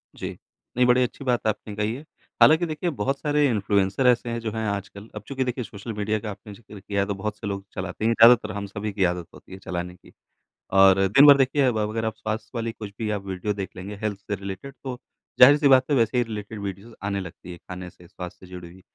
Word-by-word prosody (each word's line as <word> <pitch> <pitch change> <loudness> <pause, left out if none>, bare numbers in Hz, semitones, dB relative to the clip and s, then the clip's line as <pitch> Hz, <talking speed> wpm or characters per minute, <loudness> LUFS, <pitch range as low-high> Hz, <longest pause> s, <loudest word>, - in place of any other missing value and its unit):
जी। - - -6 0.4
नहीं, 125 - +5
बड़ी 125 +1 +4
अच्छी 125 +3 -5
बात 120 -4 0
आपने 105 -1 -3
कही 105 +1 -1
है। 135 - -8 0.4
हालाँकि 160 +3 +6
देखिए, 160 +2 -2
बहुत 135 -1 -2
सारे 150 0 +2
इन्फ्लुएंसर 100 +2 +1
ऐसे 120 -1 +3
हैं, 115 0 -2
जो 115 -1 -4
हैं 110 0 -3
आजकल। 100 +1 -5
अब 105 - -5
चूँकि 135 -1 -2
देखिए, 125 0 -3
सोशल 105 +1 -8
मीडिया 105 +1 -1
का 105 0 -5
आपने 105 +1 -11
ज़िक्र 105 -1 -13
किया 100 +1 -2
है, - - +1
तो 100 - -1
बहुत 105 +2 -4
से 105 - -6
लोग 100 -1 -4
चलाते 95 +2 -5
ही - - +4
हैं। - - +3
ज़्यादातर 115 -1 +7
हम 100 0 -4
सभी 105 +2 -5
की 100 -1 0
आदत 90 -1 -2
होती - - -16
है - - -7
चलाने 90 -1 -5
की - - -20 0.6
और 95 0 +6
दिन 135 +9 +6
भर 140 -1 +9
देखिए, 135 +2 +2
अब 125 -4 +1
अगर 110 +1 -2
आप 110 -1 -2
स्वास्थ्य 110 0 -4
वाली 115 0 -2
कुछ 105 -2 -9
भी 110 -2 -2
आप 100 - -11
वीडियो 95 +2 -3
देख 100 -2 -6
लेंगे, 95 +3 -7
हेल्थ 105 -2 -2
से 105 +1 -4
रिलेटेड, 100 +7 -7
तो 130 -2 -5 0.4
ज़ाहिर-सी 145 +3 +8
बात 130 -1 +6
है, - - +4
वैसे 115 +1 +2
ही 120 - +3
रिलेटेड 110 -1 -7
वीडियोज़ 100 +3 -7
आने 100 0 -1
लगती 90 -1 -9
हैं, 85 - -10
खाने 90 0 -7
से, 90 0 -18
स्वास्थ्य 90 +1 -9
से 90 - -17
जुड़ी 90 -1 -8
हुई। 95 +2 -16
105 Hz, 250 wpm, -24 LUFS, 100-120 Hz, 0.6 s, भर